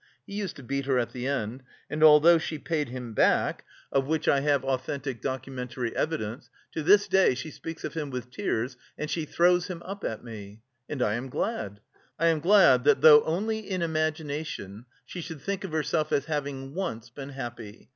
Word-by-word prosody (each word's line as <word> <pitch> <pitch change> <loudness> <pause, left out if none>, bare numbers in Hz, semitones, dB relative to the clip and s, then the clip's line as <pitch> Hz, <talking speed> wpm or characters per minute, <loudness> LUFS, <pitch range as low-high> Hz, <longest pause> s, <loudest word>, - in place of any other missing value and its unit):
He - - -10
used 200 -2 -3
to 140 - -11
beat 140 +3 -2
her 135 -2 +2
at 120 -2 0
the 125 +1 -4
end: 130 -2 -2 0.3
and 155 +1 -1
although 155 +2 +8
she 160 -1 -4
paid 150 -2 -2
him 125 -2 -6
back, - - +2 0.3
of 135 -1 +1
which 160 0 -1
I 140 - +5
have 140 -1 +1
authentic 135 -1 -3
documentary 130 -2 -4
evidence, 135 -5 -3 0.2
to 160 - -3
this 200 +6 +5
day 190 -9 +4
she 130 +5 -6
speaks 165 +2 -8
of - - -4
him 150 -3 -3
with 125 -1 -6
tears 125 0 -2 0.2
and 150 - -4
she 165 -2 -1
throws 175 +3 +3
him 175 -3 -6
up 200 +2 -6
to 110 - -3
me; 110 -2 -10 0.3
and 135 -4 -1
I 105 - +1
am 120 +4 -4
glad, 105 - -3 0.4
I 165 +1 +3
am 160 -2 +2
glad 165 -8 +6
that, 145 - +4
though 150 -1 +9
only 215 +7 -1
in 190 -4 -3
imagination, 155 - -3 0.2
she 180 - -7
should 165 -2 -7
think 200 -1 -3
of 190 - -5
herself 155 0 0
as 140 - +1
having 140 -3 -4
once 125 - -4
been 135 +2 -8
happy.... 120 -5 -8
145 Hz, 195 wpm, -27 LUFS, 125-165 Hz, 0.4 s, though